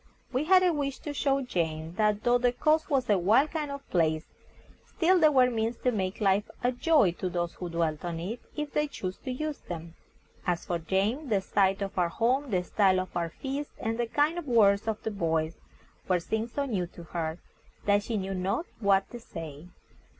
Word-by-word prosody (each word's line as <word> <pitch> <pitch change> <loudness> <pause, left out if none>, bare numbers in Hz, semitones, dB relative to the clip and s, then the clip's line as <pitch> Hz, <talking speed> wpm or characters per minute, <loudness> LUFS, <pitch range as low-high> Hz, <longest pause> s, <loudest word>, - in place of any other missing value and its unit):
We 260 +4 +1
had 370 +2 +6
a 360 -2 +3
wish 280 -3 -2
to 295 - -5
show 275 -1 +1
Jane 160 -7 -2
that, 210 +1 +1
though 245 0 +4
the 245 0 +3
coast 310 +6 +2
was 270 -4 +1
a 205 -3 +3
wild 225 - +4
kind 305 -3 -2
of 280 0 -7
place, 160 -2 +2 0.6
still 370 0 +2
there 310 -2 +6
were 255 -3 +5
means 225 +1 -1
to 250 - +3
make 190 -4 -2
life 200 +1 +2
a 245 - +3
joy 255 - +3
to 185 - -1
those 175 -1 -2
who 180 - -6
dwelt 165 -2 -1
on 170 -2 -3
it, 205 +8 -4 0.2
if 300 -1 -4
they 300 0 +1
chose 185 -9 -5
to 260 - -6
use 305 +3 -3
them. 165 -1 -7 0.5
As 175 -1 0
for 175 -1 -1
Jane, 205 - 0
the 205 -3 +3
sight 195 +1 +1
of 195 -1 -4
our 175 -1 +2
home, 255 +9 +1
the 185 -4 +1
style 190 0 +3
of 185 0 -5
our 170 -1 -1
feast, 275 - -4
and 225 +1 -2
the 240 - +1
kind 305 +8 +1
words 210 -4 +4
of 220 -1 -1
the 220 - -2
boys, 165 -4 -1 0.5
were 185 -1 +3
things 220 +6 -3
so 285 - -1
new 195 -9 -1
to 170 0 -12
her, 160 0 -3 0.5
that 205 0 +4
she 220 +1 -3
knew 195 0 -3
not 190 - -1
what 200 -3 +3
to 240 - -7
say. 165 -7 -8
210 Hz, 210 wpm, -29 LUFS, 180-270 Hz, 0.6 s, had